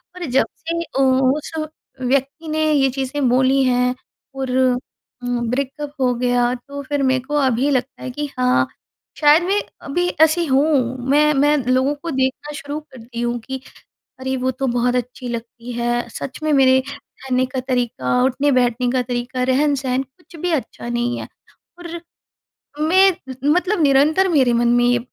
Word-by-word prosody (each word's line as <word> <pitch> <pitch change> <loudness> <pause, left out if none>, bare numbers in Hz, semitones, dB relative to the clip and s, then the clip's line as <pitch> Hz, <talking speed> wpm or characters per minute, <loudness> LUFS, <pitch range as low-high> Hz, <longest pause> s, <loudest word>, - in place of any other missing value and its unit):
और 360 -1 -5
जब 265 -2 +2
से 335 +1 -3
अ, 270 - -5
उस 265 +2 +2 0.5
व्यक्ति 275 +5 -1
ने 310 0 0
ये 275 -3 +3
चीज़ें 265 +1 -1
बोली 260 +2 +3
हैं 250 0 +2 0.4
और 265 -1 -3 0.7
उम, 240 -1 -1
ब्रेकअप 280 +3 -3
हो 250 -1 +3
गया, 245 0 +1
तो 280 +3 -8
फिर 285 0 -1
मेरे 260 -1 +2
को 290 +3 -4
अभी 265 -1 +2
लगता 255 -1 -2
है - - -4
कि 290 +3 -4
हाँ, 250 0 +3 0.5
शायद 300 +3 +6
मैं 395 +3 +1 0.3
अभी 355 +5 0
ऐसी 320 +2 +4
हूँ। 265 -3 +2
मैं 300 +2 +4
मैं 295 +2 +3
लोगों 260 +3 +2
को 330 +3 -6
देखना 265 +2 -1
शुरू 285 +1 -5
करती 250 -5 -9
हूँ 240 0 -1
कि 260 +3 -6 0.6
अरे! 265 0 -2
वो 260 0 0
तो 265 +1 -3
बहुत 245 0 +1
अच्छी 250 +1 -4
लगती 235 +1 -6
है। 240 0 -1
सच 255 +3 -7
में 310 0 +1
मेरे 260 -2 +5 0.2
रहने 255 -1 -2
का 255 +1 -4
तरीका, 245 - 0
उठने-बैठने 255 -2 +2
का 255 0 +1
तरीका, 245 +1 -3
रहन-सहन 265 0 +1
कुछ 300 +6 -17
भी 355 - -1
अच्छा 250 -4 -3
नहीं 240 0 -1
है। - - -6 0.5
और 350 -1 -8 0.9
मैं 375 +5 +5
उम 265 -5 -9
उम, - - +6
मतलब 365 +2 +1
निरंतर 300 +7 +4
मेरे 270 -8 +3
मन 235 0 +2
में 240 0 +3
ये 245 0 +3
265 Hz, 170 wpm, -20 LUFS, 250-290 Hz, 0.9 s, शायद